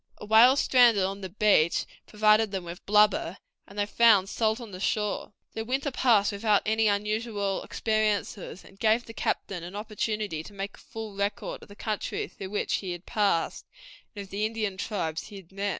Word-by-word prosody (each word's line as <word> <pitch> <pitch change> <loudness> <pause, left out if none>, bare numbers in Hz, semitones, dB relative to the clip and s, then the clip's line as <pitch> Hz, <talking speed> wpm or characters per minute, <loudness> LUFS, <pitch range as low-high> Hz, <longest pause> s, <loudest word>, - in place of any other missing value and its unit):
A - - -9
whale 225 +5 +7
stranded 245 -7 +4
on 195 +1 -3
the 190 - -5
beach 195 -4 +3 0.2
provided 215 +1 +3
them 190 -2 -4
with 175 +1 -9
blubber, 205 -3 +3 0.3
and 200 - -14
they 205 - +1
found 210 -3 +4
salt 220 +1 0
on 230 -4 -9
the 185 - -8
shore. 210 +1 -1 0.2
The 220 - -3
winter 270 +5 -1
passed 230 -6 +3
without 205 0 +2
any 220 0 +2
unusual 210 -1 -1
experiences, 215 -4 -2
and 195 - -18
gave 225 +2 +2
the 225 - -10
captain 195 -4 -2
an 175 +3 -8
opportunity 210 -4 -3
to 205 - -12
make 200 0 -5
a - - -19
full 225 -2 -8
record 200 +1 -3
of - - -15
the 205 - -12
country 225 - -3
through 190 - -9
which 210 - -1
he 185 -3 -4
had 175 +1 -10
passed, 200 -6 0 0.5
and 200 - -5
of 195 - -16
the 200 +2 -2
Indian 215 -3 -2
tribes 175 -5 -3
he 210 - -12
had 190 -3 -12
met. 200 +1 -2
210 Hz, 195 wpm, -27 LUFS, 195-220 Hz, 0.5 s, whale